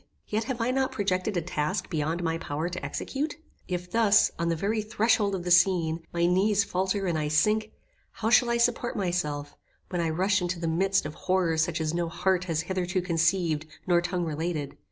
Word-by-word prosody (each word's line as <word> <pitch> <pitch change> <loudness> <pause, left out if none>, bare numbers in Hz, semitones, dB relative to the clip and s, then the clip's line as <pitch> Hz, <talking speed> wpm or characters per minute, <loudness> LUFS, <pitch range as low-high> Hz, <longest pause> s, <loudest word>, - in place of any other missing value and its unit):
Yet 220 +1 -1
have 260 -3 -3
I 230 +2 +1
not 265 0 0
projected 195 -1 -1
a 170 - 0
task 160 +3 -2
beyond 160 +2 -1
my 165 0 -1
power 155 +2 -3
to 180 - -6
execute? 290 +3 -3 0.3
If 180 -1 -4
thus, 215 -1 +4
on 170 0 0
the 165 - +1
very 210 +6 -1
threshold 210 -1 +1
of 180 - -4
the 180 - -2
scene, 170 -2 +3
my 170 0 +1
knees 195 +3 +3
faulter 190 0 -1
and 170 -4 0
I 150 - -1
sink, 215 +8 +2 0.4
how 225 0 -2
shall 240 0 +5
I 235 - +2
support 240 0 +1
myself, 150 -7 -2 0.3
when 175 -2 -1
I 165 - 0
rush 190 +4 +1
into 175 0 -2
the 165 - -2
midst 190 +3 +1
of 150 - -5
horrors 175 -3 +1
such 170 0 -1
as 160 0 -1
no 170 -1 -1
heart 180 +2 0
has 165 -3 -1
hitherto 180 +1 -1
conceived, 165 -2 +1 0.2
nor 175 -2 +3
tongue 175 0 -2
related? 155 -2 -3
180 Hz, 200 wpm, -27 LUFS, 165-200 Hz, 0.4 s, shall